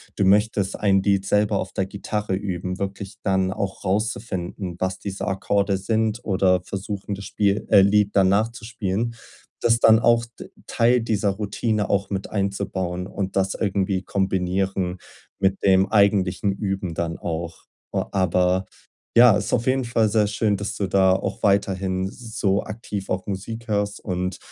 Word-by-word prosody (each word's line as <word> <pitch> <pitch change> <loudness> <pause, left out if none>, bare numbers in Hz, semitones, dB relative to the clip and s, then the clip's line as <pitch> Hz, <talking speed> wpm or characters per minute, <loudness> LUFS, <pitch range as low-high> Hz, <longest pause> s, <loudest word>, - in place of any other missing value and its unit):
du 100 - +1
möchtest 100 0 +2
ein 95 -2 +3
Lied 100 -1 +2
selber 105 0 +2
auf 95 - -5
der 95 - 0
Gitarre 105 0 -3
üben, 90 -2 -4
wirklich 100 0 -5
dann 95 -1 +1
auch 95 0 -4
rauszufinden, 95 -3 -2
was 95 0 -2
diese 100 -1 -5
Akkorde 100 +1 0
sind 110 +3 0
oder 95 -2 +2
versuchen, 100 +2 -5
das 100 +1 -9
Spiel, 100 0 0
äh 100 -3 +7
Lied 100 +1 +3
dann 95 -2 +5
nachzuspielen. 110 +1 -1 0.5
Das 115 0 +4
dann 110 -1 +6
auch 115 0 +3
d - - -9 0.2
Teil 120 +1 +2
dieser 105 -3 0
Routine 105 +1 -1
auch 100 0 0
mit 95 -1 -4
einzubauen 95 -3 -2
und 95 -1 -4
das 95 0 +1
irgendwie 95 -2 -1
kombinieren 95 -1 -1 0.4
mit 95 0 +1
dem 95 0 +4
eigentlichen 100 -2 +3
Üben 95 -3 -3
dann 85 -1 -2
auch. 85 0 -5 0.3
O - - 0
aber, 90 0 +2 0.5
ja, 120 -3 +8
ist 105 - -2
auf 120 -1 +1
jeden 130 0 +2
Fall 115 -2 +1
sehr 105 -1 +2
schön, 105 -1 0
dass 100 +4 -4
du 100 - -1
da 95 -1 +4
auch 95 - -3
weiterhin 95 -2 +1
so 110 -4 -1
aktiv 105 -2 -6
auch 95 0 -2
Musik 110 +4 -5
hörst 100 -1 -1
und 90 -1 -3
100 Hz, 160 wpm, -23 LUFS, 95-105 Hz, 0.5 s, ja